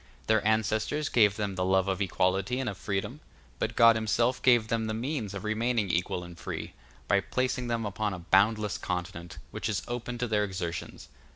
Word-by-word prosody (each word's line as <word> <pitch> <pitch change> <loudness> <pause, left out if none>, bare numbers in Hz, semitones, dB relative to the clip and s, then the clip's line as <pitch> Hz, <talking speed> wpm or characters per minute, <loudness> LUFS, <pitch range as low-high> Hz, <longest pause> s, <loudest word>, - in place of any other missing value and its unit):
Their 110 -1 +3
ancestors 110 +7 +1
gave 105 -4 +4
them 105 -3 -2
the 90 0 -1
love 95 +1 +2
of 95 0 -1
equality 95 +5 +1
and 135 - -2
of 105 - -2
freedom, 100 +8 -3 0.4
but - - -2
God 115 -1 +7
himself 115 +3 +1
gave 120 -4 +5
them 110 -1 -1
the 110 - -2
means 115 -4 -3
of 100 - -5
remaining 110 -2 0
equal 90 +1 -1
and 85 0 -10
free, - - -6 0.3
by 100 - +4
placing 125 +4 -1
them 115 -2 -1
upon 105 +1 -2
a 95 - -4
boundless 100 +4 +2
continent, 90 -1 -4
which - - -3
is 105 - -1
open 120 0 -4
to 125 +1 -1
their 105 -2 +2
exertions. 90 -4 -5
105 Hz, 190 wpm, -29 LUFS, 95-115 Hz, 0.4 s, God